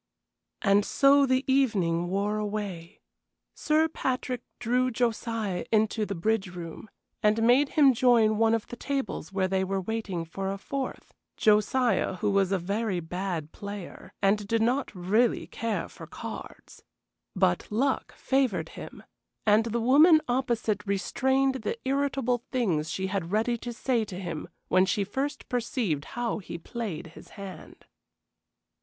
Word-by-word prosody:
And 200 Hz, +1 st, +4 dB
so 275 Hz, +4 st, +4 dB
the 260 Hz, 0 st, +2 dB
evening 195 Hz, -11 st, +2 dB
wore 200 Hz, +3 st, 0 dB
away. 205 Hz, -4 st, -5 dB, 0.5 s
Sir 310 Hz, +1 st, +2 dB
Patrick 255 Hz, -5 st, -2 dB, 0.2 s
drew 250 Hz, +2 st, +1 dB
Josiah 225 Hz, -5 st, -1 dB
into 215 Hz, -1 st, +2 dB
the 200 Hz, -, -3 dB
bridge 210 Hz, +3 st, 0 dB
room, 175 Hz, +3 st, -8 dB, 0.3 s
and 215 Hz, +1 st, +3 dB
made 255 Hz, +5 st, +5 dB
him 280 Hz, -3 st, +7 dB
join 225 Hz, -3 st, +4 dB
one 225 Hz, 0 st, +4 dB
of 225 Hz, -, -3 dB
the -, -, -8 dB
tables 270 Hz, -, -3 dB
where 190 Hz, -1 st, +1 dB
they 190 Hz, 0 st, 0 dB
were 195 Hz, +1 st, -1 dB
waiting 190 Hz, -4 st, -3 dB
for 195 Hz, +4 st, -4 dB
a 195 Hz, -, -4 dB
fourth 265 Hz, +6 st, -5 dB, 0.2 s
Josiah, 215 Hz, -1 st, +2 dB
who 205 Hz, +2 st, 0 dB
was 195 Hz, -1 st, +2 dB
a 195 Hz, -, +3 dB
very 200 Hz, +2 st, -1 dB
bad 175 Hz, -2 st, -4 dB
player, 200 Hz, -2 st, -8 dB
and 200 Hz, +1 st, +2 dB
did 225 Hz, +1 st, +2 dB
not 255 Hz, +4 st, +1 dB
really 210 Hz, +7 st, +2 dB
care 215 Hz, -7 st, -3 dB
for -, -, -11 dB
cards! -, -, -9 dB, 0.5 s
But 90 Hz, -, +1 dB
luck 260 Hz, +6 st, 0 dB
favored 265 Hz, -4 st, 0 dB
him, -, -, -10 dB, 0.4 s
and 215 Hz, +1 st, +4 dB
the 235 Hz, +1 st, -1 dB
woman 300 Hz, +8 st, +7 dB
opposite 235 Hz, -4 st, 0 dB
restrained 265 Hz, +6 st, +1 dB
the 225 Hz, -, -2 dB
irritable 270 Hz, -3 st, +1 dB
things 175 Hz, -12 st, 0 dB
she 190 Hz, -, -2 dB
had 190 Hz, -3 st, -3 dB
ready 225 Hz, +3 st, +1 dB
to 240 Hz, -, -5 dB
say 240 Hz, 0 st, 0 dB
to 185 Hz, -3 st, -7 dB
him 170 Hz, -5 st, -5 dB, 0.2 s
when 185 Hz, +1 st, +4 dB
she 200 Hz, +3 st, +1 dB
first 275 Hz, +8 st, -3 dB
perceived 235 Hz, -, -1 dB
how 240 Hz, -2 st, -1 dB
he 180 Hz, -3 st, -7 dB
played 180 Hz, -3 st, -5 dB
his -, -, -13 dB
hand. 195 Hz, -4 st, -10 dB
215 Hz, 150 wpm, -28 LUFS, 190-250 Hz, 0.5 s, him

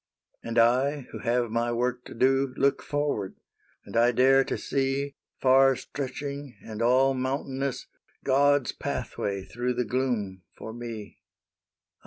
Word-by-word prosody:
" -, -, -45 dB
And 115 Hz, 0 st, -4 dB
I, 130 Hz, +5 st, +3 dB
who -, -, -7 dB
have 120 Hz, -1 st, 0 dB
my 120 Hz, +1 st, 0 dB
work 125 Hz, +1 st, -1 dB
to -, -, -10 dB
do, 135 Hz, 0 st, +2 dB
Look 140 Hz, 0 st, +2 dB
forward; 145 Hz, -10 st, -2 dB, 0.5 s
and -, -, -10 dB
I 120 Hz, +1 st, +5 dB
dare 135 Hz, +3 st, +5 dB
to -, -, -2 dB
see, 135 Hz, +1 st, -1 dB, 0.3 s
Far 135 Hz, 0 st, +5 dB
stretching 140 Hz, -1 st, -6 dB
and 110 Hz, 0 st, -6 dB
all 130 Hz, +3 st, +4 dB
mountainous, 135 Hz, 0 st, -2 dB, 0.4 s
God's 140 Hz, 0 st, +3 dB
pathway 100 Hz, -1 st, -3 dB
through 125 Hz, +1 st, -2 dB
the 125 Hz, 0 st, 0 dB
gloom 110 Hz, -6 st, -1 dB, 0.2 s
for 110 Hz, -, -7 dB
me. 115 Hz, -3 st, -8 dB
130 Hz, 140 wpm, -27 LUFS, 120-135 Hz, 0.5 s, I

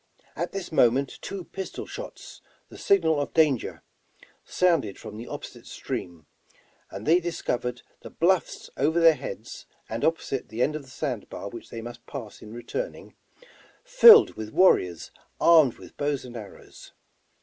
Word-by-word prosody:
At -, -, -3 dB
this 195 Hz, -2 st, -6 dB
moment 135 Hz, -2 st, +2 dB
two 195 Hz, -2 st, -6 dB
pistol 190 Hz, +2 st, -7 dB
shots, -, -, -9 dB, 0.3 s
the -, -, -12 dB
signal 160 Hz, -6 st, +3 dB
of 140 Hz, -, -5 dB
danger, 150 Hz, -7 st, +1 dB, 0.6 s
sounded 165 Hz, -, +1 dB
from 105 Hz, -, -10 dB
the 115 Hz, +3 st, -8 dB
opposite -, -, -9 dB
stream, 85 Hz, -3 st, -6 dB, 0.6 s
and 100 Hz, +3 st, -8 dB
they 170 Hz, +3 st, +5 dB
discovered 125 Hz, -8 st, -3 dB, 0.2 s
the -, -, -10 dB
bluffs 180 Hz, +2 st, 0 dB
over 160 Hz, +5 st, +2 dB
their 165 Hz, -1 st, +7 dB
heads, -, -, -8 dB, 0.2 s
and 115 Hz, +1 st, -5 dB
opposite 160 Hz, -5 st, -1 dB
the 115 Hz, +3 st, -1 dB
end 150 Hz, -, 0 dB
of 155 Hz, -, -4 dB
the 135 Hz, -, -17 dB
sand 130 Hz, -5 st, -4 dB
bar 100 Hz, -, -7 dB
which 115 Hz, -, -10 dB
they 115 Hz, -, -7 dB
must 120 Hz, +1 st, -9 dB
pass 105 Hz, -3 st, -8 dB
in 105 Hz, -, -11 dB
returning, 120 Hz, -, -6 dB, 0.7 s
filled 475 Hz, -3 st, +8 dB
with 110 Hz, -1 st, -7 dB
warriors 90 Hz, -, +3 dB, 0.3 s
armed 160 Hz, -7 st, +5 dB
with -, -, -14 dB
bows 145 Hz, -2 st, -2 dB
and 120 Hz, -1 st, -10 dB
arrows. 105 Hz, -4 st, -12 dB
140 Hz, 155 wpm, -26 LUFS, 115-170 Hz, 0.7 s, filled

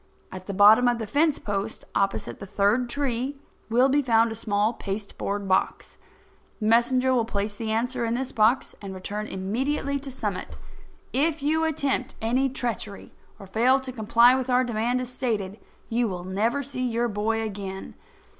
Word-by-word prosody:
At 185 Hz, 0 st, -9 dB
the 200 Hz, -, -3 dB
bottom 215 Hz, +5 st, +7 dB
of 240 Hz, -1 st, +2 dB
the 225 Hz, -, -4 dB
fence 295 Hz, +7 st, +2 dB
post, 205 Hz, +1 st, -4 dB
opposite 195 Hz, 0 st, -1 dB
the 200 Hz, -, -8 dB
third 210 Hz, +5 st, +1 dB
tree, 270 Hz, 0 st, -2 dB, 0.3 s
will 245 Hz, +4 st, +4 dB
be 285 Hz, +2 st, +3 dB
found 230 Hz, -3 st, +3 dB
a -, -, -4 dB
small 215 Hz, 0 st, 0 dB
pasteboard 200 Hz, -1 st, -4 dB
box. 190 Hz, -, -1 dB, 0.6 s
The 215 Hz, -, -3 dB
messenger 250 Hz, +3 st, +3 dB
will 240 Hz, -2 st, +3 dB
place 205 Hz, -2 st, -2 dB
the 220 Hz, +1 st, -5 dB
answer 240 Hz, +3 st, -1 dB
in 230 Hz, 0 st, 0 dB
this 265 Hz, +1 st, -3 dB
box 230 Hz, +5 st, +2 dB
and 195 Hz, -2 st, -7 dB
return 205 Hz, +3 st, -5 dB
immediately 265 Hz, +9 st, -2 dB
to 275 Hz, 0 st, -8 dB
Summit. 260 Hz, -, -4 dB, 0.6 s
If 300 Hz, +2 st, +1 dB
you 315 Hz, +2 st, +2 dB
attempt 280 Hz, -4 st, -1 dB
any 255 Hz, +5 st, +1 dB
treachery 235 Hz, -5 st, -4 dB, 0.2 s
or 195 Hz, -, -11 dB
fail 240 Hz, +7 st, +3 dB
to 260 Hz, -1 st, -6 dB
comply 235 Hz, +1 st, +5 dB
with 260 Hz, 0 st, -1 dB
our 250 Hz, 0 st, +4 dB
demand 240 Hz, +1 st, 0 dB
as 250 Hz, -, -5 dB
stated, 215 Hz, -6 st, -3 dB, 0.3 s
you 235 Hz, +1 st, +1 dB
will 180 Hz, -3 st, -5 dB
never 220 Hz, +9 st, 0 dB
see 265 Hz, -1 st, -5 dB
your 240 Hz, -1 st, 0 dB
boy 220 Hz, +1 st, -1 dB
again. 195 Hz, -3 st, -6 dB
230 Hz, 175 wpm, -25 LUFS, 205-260 Hz, 0.6 s, bottom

